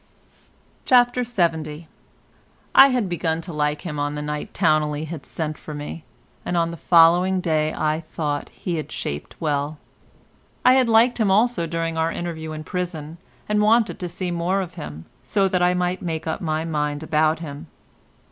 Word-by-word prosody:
CHAPTER 245 0 +4
LXX 165 -9 -1 0.9
I 270 - +9
had 250 -6 0
begun 165 -2 -1
to 170 0 -8
like 150 0 -1
him 150 -5 -4
on 145 +1 -1
the 150 - -4
night 150 0 -4
Towneley 155 -3 +1
had 160 -2 -8
sent 155 -2 -4
for 155 - -8
me, 150 +2 -6 0.4
and 175 - -1
on 170 0 +1
the - - -6
following 175 +3 +5
day 155 -3 +1
I 155 0 0
thought 155 -2 -3
he 175 -2 -4
had 155 - -5
shaped 75 +1 -5
well. 150 -1 -1 0.9
I 255 - +8
had 260 -2 +3
liked 230 +2 +4
him 215 -3 +3
also 205 -3 +2
during 165 0 -2
our 160 +1 +1
interview 160 -2 -5
in 155 0 -6
prison, 170 -2 -5 0.3
and 210 0 +2
wanted 225 +2 +3
to 180 - -4
see 180 +1 -4
more 175 +3 0
of 180 -2 -6
him, 75 +2 -8 0.2
so 195 -2 +1
that 180 -1 0
I 180 0 +3
might 180 +1 -1
make 160 -3 -3
up 160 - -3
my 155 -2 -1
mind 150 -2 -2
about 155 0 +2
him. 155 0 -8
165 Hz, 175 wpm, -23 LUFS, 155-180 Hz, 0.9 s, I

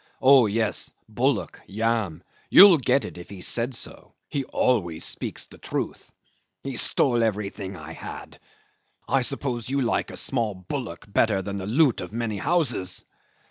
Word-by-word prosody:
"Oh 130 -3 +7
yes. 110 +1 -1 0.2
Bullock. - - -1
Yam. 110 -5 -1 0.3
You'll 190 -5 +9
get 130 +1 +2
it - - -8
if 85 - -11
he 95 -2 -9
said 120 +6 -1
so. - - -6
He 140 - -1
always 85 -14 0
speaks - - -4
the - - -16
truth. - - -4 0.5
He 135 -2 -4
stole 120 0 +2
everything 100 -3 -3
I 80 0 -9
had. - - -9 0.7
I 135 - +2
suppose 125 -3 -2
you 140 +1 0
like 120 - 0
a - - -8
small 115 -6 -1
bullock 95 - -6
better 100 -1 +2
than 100 +1 -4
the 95 0 -5
loot 130 +2 +3
of 90 - -7
many 115 -2 -2
houses." 120 - 0
115 Hz, 155 wpm, -25 LUFS, 100-130 Hz, 0.7 s, You'll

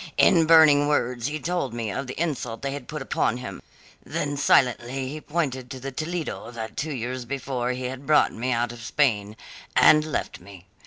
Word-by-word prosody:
In 165 -2 +5
burning 155 -3 +7
words 125 -4 0
he 150 +1 -3
told 165 -8 -2
me 115 -3 -3
of 135 +6 -4
the 130 - -7
insult 140 -8 -3
they 140 - -1
had 140 -3 -7
put - - -5
upon - - 0
him, - - -7 0.4
then 145 0 -3
silently 130 -1 +2
he 155 +2 -6
pointed 140 -6 -2
to 130 - -7
the 135 +2 -6
Toledo 155 0 -4
that 115 -2 -7
two 155 +1 -3
years 125 -1 -4
before 125 -1 -3
he 130 +1 -5
had 130 +2 -6
brought 155 -1 +4
me 125 +3 -2
out 120 0 0
of 120 -1 -10
Spain, 110 -4 0 0.4
and 155 0 +6
left 155 - -4
me. 95 -1 -14
130 Hz, 195 wpm, -25 LUFS, 120-150 Hz, 0.4 s, burning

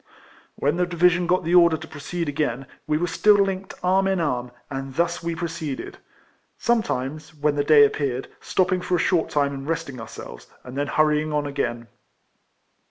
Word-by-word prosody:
When 145 +4 0
the 180 0 +1
division 175 0 +3
got 180 +1 +2
the 170 +1 -1
order 170 -2 +6
to - - -10
pro 145 - -11
ceed 170 +3 -3
again, 140 -3 -1 0.2
we 150 0 +2
were 175 - 0
still 210 +4 +4
linked 195 -1 0
arm 190 +1 +3
in 190 -1 +1
arm, 125 -6 -1 0.2
and 135 -1 -6
thus 170 +2 0
we 170 0 -3
proceeded; 165 -4 -5 0.6
sometimes, 155 - -1
when 150 0 0
tlie 145 0 -1
day 150 -2 +8
appeared, 135 -3 -2
stopping 185 -1 0
for 180 0 0
a - - +2
short 170 -1 +1
time 140 -1 +1
and 135 0 -7
resting 160 -7 -3
ourselves, - - -10 0.2
and 125 0 -9
then 145 +1 -1
hurrying 155 +1 +2
on 150 -1 0
again. 120 -5 -3
155 Hz, 180 wpm, -24 LUFS, 140-175 Hz, 0.6 s, day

